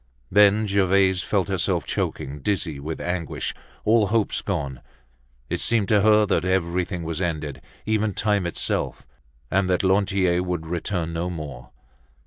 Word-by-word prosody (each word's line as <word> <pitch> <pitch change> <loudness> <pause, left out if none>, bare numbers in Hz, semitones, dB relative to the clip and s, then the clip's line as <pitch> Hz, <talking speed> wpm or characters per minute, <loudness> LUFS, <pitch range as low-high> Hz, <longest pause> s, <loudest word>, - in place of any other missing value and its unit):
Then 105 +2 +5
Gervaise 95 -2 +3
felt - - 0
herself - - 0
choking, 70 +2 -3
dizzy 85 -3 -1
with 80 +3 -5
anguish, 90 -2 -3 0.3
all 110 -1 +4
hopes 110 +1 +1
gone; 70 -10 -3 0.7
it - - -2
seemed 110 -4 +2
to 105 -2 +4
her 105 0 +5
that 100 - +1
everything 90 -1 0
was 80 +2 -3
ended, 75 -6 -3 0.2
even 110 -2 0
time 105 -4 +1
itself, 85 - -2 0.5
and 95 0 +2
that 90 +1 +1
Lantier 95 -2 +2
would 90 -3 -3
return 85 0 -2
no 85 +2 -2
more. 75 -7 -7
90 Hz, 140 wpm, -24 LUFS, 85-100 Hz, 0.7 s, Then